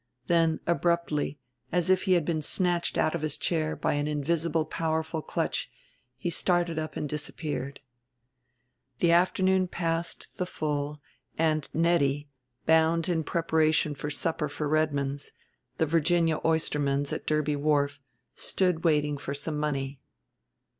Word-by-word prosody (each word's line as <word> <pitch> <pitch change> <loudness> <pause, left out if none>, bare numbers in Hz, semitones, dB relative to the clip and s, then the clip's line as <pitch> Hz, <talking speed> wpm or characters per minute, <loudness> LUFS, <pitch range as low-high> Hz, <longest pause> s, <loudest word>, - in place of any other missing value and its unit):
Then, 165 -1 +3
abruptly, 170 -4 0 0.3
as 180 +1 +2
if 185 +1 +3
he 190 - +4
had 170 -4 +3
been 160 -2 0
snatched 175 +2 +1
out 155 - +2
of 170 - -2
his 155 -1 -1
chair 160 -2 0
by - - 0
an 145 0 0
invisible 155 +2 0
powerful 160 0 -2
clutch, - - -2 0.5
he 175 - -2
started 175 -2 +1
up 155 -2 -5
and 150 - -2
disappeared. 145 -1 -4 1.2
The 170 +3 +3
afternoon 185 +2 +3
passed 165 -1 -3
the 180 - 0
full 150 -2 -2 0.4
and 155 -2 +1
Nettie, 145 -4 +1 0.3
bound 160 +1 +3
in 165 -2 +1
preparation 160 -2 +2
for 145 +1 -5
supper 150 0 -1
for 150 +1 -3
Redmond's, 145 -2 0 0.4
the 160 - +2
Virginia 165 0 +2
Oysterman's 145 -3 +1
at - - -5
Derby 150 -1 +1
Wharf, 145 -1 +1 0.3
stood 180 -4 0
waiting 150 -3 +2
for 140 0 -4
some 150 +1 -3
money. 140 -2 -2
155 Hz, 135 wpm, -28 LUFS, 150-170 Hz, 1.2 s, he